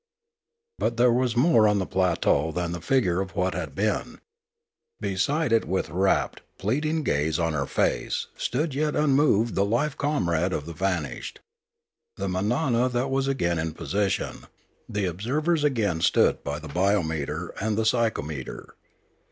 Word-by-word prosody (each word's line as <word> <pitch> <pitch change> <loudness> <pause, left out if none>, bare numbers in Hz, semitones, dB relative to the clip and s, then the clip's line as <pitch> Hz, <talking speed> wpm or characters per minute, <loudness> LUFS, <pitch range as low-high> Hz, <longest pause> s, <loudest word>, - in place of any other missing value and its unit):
But 115 - 0
there 120 0 +5
was 125 -1 0
more 125 -5 +5
on 105 0 +3
the 95 - 0
plateau 85 -5 +1
than 85 +1 -2
the 85 -1 -5
figure 95 -6 +2
of 95 0 -6
what 90 -2 0
had 80 -5 -5
been. - - -1 0.8
Beside 115 +9 0
it 115 - +3
with 95 -3 -2
rapt, 95 +3 +1 0.2
pleading 150 +10 0
gaze 75 - 0
on 80 -2 0
her 70 -2 -1
face - - 0
stood 145 +4 -1
yet 150 +2 0
unmoved 140 -6 +3
the 100 - +2
life 120 +8 0
comrade 90 - 0
of 75 - -3
the 85 - -7
vanished. 85 -4 -3 0.8
The 100 - -2
manana 120 - +1
was 135 0 0
again 85 -12 0
in 80 0 -2
position, 100 +3 -2 0.4
the 100 -1 -1
observers 145 - 0
agaiu 110 - +1
stood 85 - +3
by 70 +1 -3
the 80 +1 -9
biometer 80 -2 0
and 110 0 0
the 110 - +1
psy 115 0 +3
chometer. 75 - -6
100 Hz, 150 wpm, -26 LUFS, 85-125 Hz, 0.8 s, there